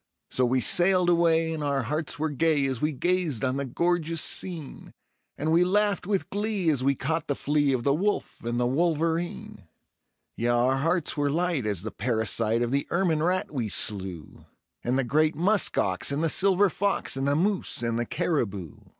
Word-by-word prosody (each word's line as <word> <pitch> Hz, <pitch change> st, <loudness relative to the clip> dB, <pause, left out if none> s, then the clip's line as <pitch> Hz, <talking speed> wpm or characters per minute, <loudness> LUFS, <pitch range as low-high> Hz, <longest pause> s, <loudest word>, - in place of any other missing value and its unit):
So 130 Hz, -1 st, +1 dB
we 130 Hz, +1 st, +1 dB
sailed 180 Hz, +3 st, +4 dB
away 165 Hz, -1 st, +2 dB
and 155 Hz, -2 st, -4 dB
our 140 Hz, -2 st, -1 dB
hearts 150 Hz, +5 st, -2 dB
were 155 Hz, +1 st, -2 dB
gay 150 Hz, 0 st, +1 dB
as 130 Hz, -3 st, -3 dB
we 150 Hz, -, +1 dB
gazed 160 Hz, -4 st, -1 dB
on 130 Hz, +1 st, -1 dB
the 140 Hz, -, -2 dB
gorgeous 165 Hz, +4 st, -1 dB
scene; 165 Hz, -7 st, -2 dB, 0.4 s
And 155 Hz, +2 st, -1 dB
we 170 Hz, +2 st, +4 dB
laughed 200 Hz, 0 st, 0 dB
with 200 Hz, -2 st, -2 dB
glee 205 Hz, -4 st, 0 dB
as 135 Hz, -4 st, +1 dB
we 140 Hz, +1 st, +2 dB
caught 160 Hz, +4 st, -2 dB
the 140 Hz, -, -1 dB
flea 145 Hz, 0 st, 0 dB
of 125 Hz, -3 st, -1 dB
the 140 Hz, -, +2 dB
wolf 200 Hz, +7 st, -2 dB
and 120 Hz, +1 st, -2 dB
the 125 Hz, -, +1 dB
wolverine; 165 Hz, +4 st, -2 dB, 0.7 s
Yea, 120 Hz, -, -1 dB
our 120 Hz, +2 st, +2 dB
hearts 165 Hz, +3 st, 0 dB
were 145 Hz, -1 st, 0 dB
light 165 Hz, -5 st, -1 dB
as 100 Hz, -4 st, -2 dB
the 110 Hz, -, -5 dB
parasite 115 Hz, 0 st, 0 dB
of 120 Hz, -, -2 dB
the 140 Hz, +1 st, -1 dB
ermine 170 Hz, -4 st, 0 dB
rat 180 Hz, 0 st, -1 dB
we 120 Hz, -6 st, -2 dB
slew, 95 Hz, -6 st, -3 dB, 0.4 s
And 125 Hz, +2 st, 0 dB
the 135 Hz, -, +1 dB
great 155 Hz, +5 st, +1 dB
musk 195 Hz, +6 st, +2 dB
ox, 95 Hz, +7 st, +1 dB
and 145 Hz, +3 st, -1 dB
the 165 Hz, -, +2 dB
silver 195 Hz, +3 st, +4 dB
fox, 200 Hz, -4 st, -1 dB
and 135 Hz, +1 st, -2 dB
the 140 Hz, -, +2 dB
moose 190 Hz, -5 st, +1 dB
and 115 Hz, 0 st, -1 dB
the 120 Hz, -, -1 dB
caribou. 110 Hz, -, -2 dB
150 Hz, 195 wpm, -26 LUFS, 125-175 Hz, 0.7 s, sailed